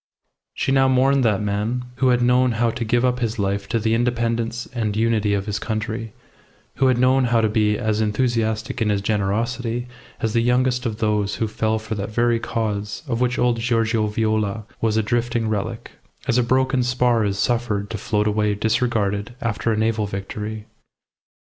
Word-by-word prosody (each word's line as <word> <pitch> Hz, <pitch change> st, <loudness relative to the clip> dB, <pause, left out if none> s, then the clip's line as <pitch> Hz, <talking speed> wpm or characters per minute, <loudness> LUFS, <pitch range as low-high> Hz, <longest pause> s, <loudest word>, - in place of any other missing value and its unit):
She -, -, -1 dB
now 135 Hz, 0 st, +4 dB
mourned 130 Hz, +1 st, +3 dB
that 105 Hz, -2 st, +2 dB
man, 105 Hz, +5 st, -1 dB
who 135 Hz, -, +2 dB
had 125 Hz, -1 st, +3 dB
known 125 Hz, 0 st, +3 dB
how 115 Hz, +1 st, +1 dB
to 120 Hz, -, -4 dB
give 120 Hz, +2 st, +2 dB
up 125 Hz, 0 st, +1 dB
his 115 Hz, -1 st, -2 dB
life 100 Hz, 0 st, -1 dB
to -, -, +1 dB
the 110 Hz, 0 st, 0 dB
independence 115 Hz, 0 st, 0 dB
and 110 Hz, -4 st, -1 dB
unity 110 Hz, -2 st, +2 dB
of 100 Hz, -1 st, -2 dB
his 105 Hz, -1 st, -2 dB
country, 110 Hz, 0 st, -3 dB, 0.7 s
who 135 Hz, -, +3 dB
had 130 Hz, -2 st, +3 dB
known 130 Hz, +1 st, +3 dB
how 115 Hz, -1 st, +2 dB
to 110 Hz, -, +3 dB
be 105 Hz, -1 st, +1 dB
as 110 Hz, -2 st, 0 dB
enthusiastic 110 Hz, +2 st, -1 dB
in 110 Hz, -, +2 dB
his 100 Hz, -1 st, +1 dB
generosity 115 Hz, +4 st, -1 dB, 0.3 s
as 110 Hz, -3 st, -1 dB
the 115 Hz, -, +3 dB
youngest 125 Hz, +1 st, +1 dB
of 110 Hz, -2 st, -4 dB
those 105 Hz, -2 st, 0 dB
who 110 Hz, -, -1 dB
fell 110 Hz, +1 st, 0 dB
for 110 Hz, 0 st, -5 dB
that 100 Hz, 0 st, -3 dB
very 115 Hz, +1 st, +1 dB
cause 105 Hz, -3 st, -3 dB
of 120 Hz, -2 st, -1 dB
which 125 Hz, 0 st, +1 dB
old 120 Hz, -1 st, +2 dB
Giorgio 115 Hz, -2 st, +1 dB
Viola 110 Hz, 0 st, -1 dB, 0.2 s
was 110 Hz, -1 st, +1 dB
a 110 Hz, -, +2 dB
drifting 120 Hz, 0 st, 0 dB
relic, 110 Hz, +2 st, -3 dB, 0.4 s
as 120 Hz, -, +3 dB
a -, -, +5 dB
broken 130 Hz, +2 st, +2 dB
spar 125 Hz, -2 st, +2 dB
is 100 Hz, -1 st, -1 dB
suffered 110 Hz, -2 st, -1 dB
to 110 Hz, -, -4 dB
float 105 Hz, -1 st, 0 dB
away 105 Hz, -1 st, +1 dB
disregarded 110 Hz, 0 st, 0 dB
after 115 Hz, -2 st, -1 dB
a 110 Hz, -, 0 dB
naval 110 Hz, -1 st, +1 dB
victory. 105 Hz, +2 st, -5 dB
115 Hz, 185 wpm, -22 LUFS, 105-120 Hz, 0.7 s, a